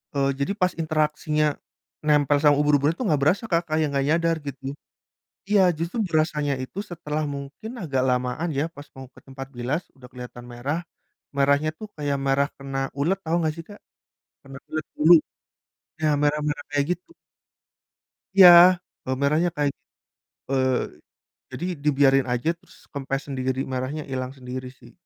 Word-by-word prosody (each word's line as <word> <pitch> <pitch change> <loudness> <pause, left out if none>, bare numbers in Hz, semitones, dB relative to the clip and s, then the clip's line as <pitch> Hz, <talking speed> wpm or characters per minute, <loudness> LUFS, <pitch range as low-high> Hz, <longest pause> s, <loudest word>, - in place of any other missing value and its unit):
Eee, 140 -1 +2
jadi 140 +8 0
pas 185 -3 +1
interaksinya 155 -1 0 0.5
nempel 150 -1 +3
sama 145 -1 +5
ubur-uburnya 150 +1 +3
tuh 255 - -3
gak 145 - 0
berasa, 180 +10 +2
Kak, 170 0 +3
kayak 155 0 +2
gak 135 0 +1
nyadar 165 +1 +2
gitu. 140 -2 -6 0.9
Iya, 205 -1 +5 0.2
justru 170 +7 -3
berasanya 155 -3 +1
itu 130 - -11
setelah 155 -4 -4
mungkin 145 +9 -6
agak 140 -7 0
lamaan 125 +6 -1
ya, 140 - +2
pas 145 0 -11
mau 130 0 -9
ke - - -16
tempat 135 0 -8
bilas 125 +7 -2 0.2
udah 125 -1 -13
kelihatan 125 -1 -9
merah. 135 +7 -2 0.6
Merahnya 140 +2 +3
tuh 215 - -8
kayak 145 -2 -1
merah 140 +1 +2
kena 135 -1 -6 0.2
ulet, 170 +7 +1
tau 165 +2 +1
gak 155 - 0
sih, 165 - -8
Kak? 205 - -11 0.6
Kena 135 0 -10
ulet 155 -1 -3
bulu. 160 +3 +6 0.9
Nah 155 -1 +3
merah-merah 150 0 0
kayak 145 -1 +1
gitu. 180 - -15 1.2
Iya, 185 -2 +11 0.6
eee, 130 - -1
merahnya 155 +5 +2
kayak 145 -2 +1 0.8
eee, 130 -1 +2 0.8
jadi 175 - -4 0.2
dibiarin 135 -2 +4
aja, 125 +5 -1
terus - - -21 0.2
kempes 135 -1 -3
sendiri, 130 -1 -2
merahnya 130 +4 -3
hilang 130 0 -3
sendiri 130 0 -6
sih. - - -16
145 Hz, 155 wpm, -24 LUFS, 135-155 Hz, 1.2 s, Iya